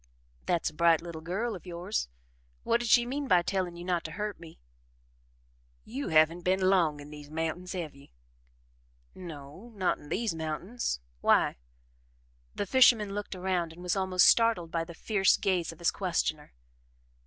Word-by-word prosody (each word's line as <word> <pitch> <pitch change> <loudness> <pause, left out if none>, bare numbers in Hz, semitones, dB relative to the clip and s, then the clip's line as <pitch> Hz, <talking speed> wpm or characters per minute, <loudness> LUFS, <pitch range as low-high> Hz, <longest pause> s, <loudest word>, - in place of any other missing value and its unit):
"That's 170 -2 +1
a - - -22
bright 165 0 +3
little 170 -2 -7
girl 200 +7 -2
of 185 - -11
yours 175 - -3 0.6
What 235 - +2
did 240 -1 -3
she 240 +2 +6
mean 275 +3 -3
by 180 -7 +4
telling 185 -2 -2
you 175 0 -8
not 180 -2 0
to 160 - -5
hurt 210 0 -4
me?" 165 -1 -13 1.3
"You 265 +5 -5
haven't 160 +1 +4
been 185 +2 +1
long 165 -6 +2
in 145 +1 -11
these 150 -1 -10
mountains, 165 +4 -3
have 170 -5 -4
ye?" 140 0 -18 1.0
"No 165 +5 -10
not 185 -3 0
in 145 - -14
THESE 215 +4 -1
mountains 160 - -3 0.2
why?" - - +3 1.0
The 205 - -2
fisherman 225 -3 +5
looked 205 -1 -5
around 180 -3 -1
and 175 +2 -12
was 180 +1 0
almost 190 -1 +3
startled 225 -8 +4
by 165 0 -1
the 170 0 -11
fierce 195 +1 +2
gaze 180 -4 0
of 165 - -13
his 170 - +1
questioner. 165 -5 -2
175 Hz, 165 wpm, -29 LUFS, 165-200 Hz, 1.3 s, she